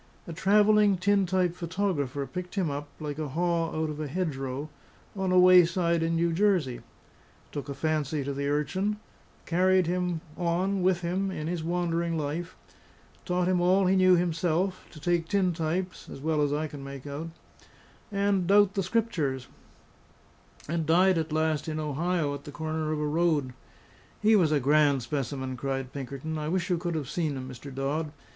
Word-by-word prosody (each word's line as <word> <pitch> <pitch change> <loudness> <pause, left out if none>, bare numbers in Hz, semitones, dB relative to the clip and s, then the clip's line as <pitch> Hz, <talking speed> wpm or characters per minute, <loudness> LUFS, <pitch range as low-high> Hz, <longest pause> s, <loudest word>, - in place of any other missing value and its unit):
A 170 - -7
travelling 205 +2 +4
tin 200 +1 +2
type 180 -1 +1
photographer 170 -6 -2
picked 180 +4 -7
him 180 -7 0
up, 145 +1 -4
like 150 -1 -5
a 155 - -2
haw 165 +3 0
out 155 -1 -2
of 150 - -7
a 155 - -3
hedgerow, 140 -4 -3 0.5
on 190 -2 -1
a 185 - +4
wayside 175 -2 +5
in 165 0 0
New 170 0 +1
Jersey; 175 -9 +1 0.7
took 145 0 -5
a 140 - -4
fancy 155 0 -1
to 140 +1 -3
the 140 +1 -2
urchin; 175 +9 0 0.5
carried 185 +1 +3
him 180 -1 -1
on 180 +3 0
with 180 -1 +2
him 185 +3 -1
in 155 -5 -4
his 170 0 -3
wandering 170 -1 -1
life; 160 +4 -3 0.7
taught 180 -1 0
him 185 -1 +2
all 185 +2 +4
he 185 +1 +3
knew 185 -1 +6
himself 175 +2 0
to 155 - -12
take 170 +1 0
tin 185 -1 +1
types 170 +3 -3
(as - - -8
well 155 +1 0
as 145 -1 +1
I 150 +2 0
can 145 -2 -8
make 140 -1 -8
out) 145 +3 -5 0.8
and 200 -3 +1
doubt 200 0 +5
the 200 - 0
Scriptures; 175 - -1 1.2
and 165 0 -2
died 180 +2 +4
at 160 -1 -3
last 155 -1 0
in 155 -1 -2
Ohio 155 +1 -1
at 140 0 -8
the 145 - -8
corner 155 0 -3
of 155 - -1
a 150 - -1
road. 150 -4 +1 0.7
"He 215 +1 +4
was 170 -7 +4
a 150 - +3
grand 140 -1 +3
specimen," 130 0 -3
cried 135 0 -3
Pinkerton; 140 +3 -5
"I 150 0 -3
wish 180 +1 -1
you 175 - +1
could 175 -1 -3
have 150 -4 -3
seen 155 -2 -2
him, 130 0 -6
Mr. 130 +2 -9
Dodd. 145 +4 -2
165 Hz, 180 wpm, -28 LUFS, 145-180 Hz, 1.2 s, knew